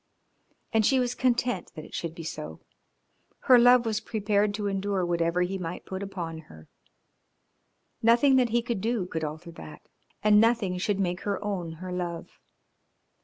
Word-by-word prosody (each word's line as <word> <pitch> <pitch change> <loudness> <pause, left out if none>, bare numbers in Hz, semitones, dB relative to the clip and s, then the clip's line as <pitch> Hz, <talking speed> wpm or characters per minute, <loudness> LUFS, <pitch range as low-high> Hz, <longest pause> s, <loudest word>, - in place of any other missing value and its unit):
And 220 -1 +3
she 265 +5 +3
was 245 -1 0
content 245 -5 0
that 155 - -8
it - - -16
should 170 -1 -4
be 165 - -8
so, 80 - -6 0.8
her 250 -2 +6
love 245 0 +6
was 220 -1 0
prepared 210 -2 0
to 205 0 -4
endure 195 -1 -1
whatever 170 0 +1
he 190 +2 -3
might 170 0 -6
put 190 0 -5
upon 175 -5 -5
her. 80 0 -14 1.3
Nothing 240 +4 +5
that 250 -2 +3
he 235 +1 +1
could 235 -5 -3
do 225 -3 0
could 160 -3 -4
alter 155 +3 -6
that, 75 - -11 0.4
and 210 0 +6
nothing 225 -6 +1
should 200 +1 -1
make 180 -2 -1
her 205 -1 -1
own 180 -5 -3
her 180 +3 -8
love. 175 -2 -5
195 Hz, 170 wpm, -27 LUFS, 170-225 Hz, 1.3 s, her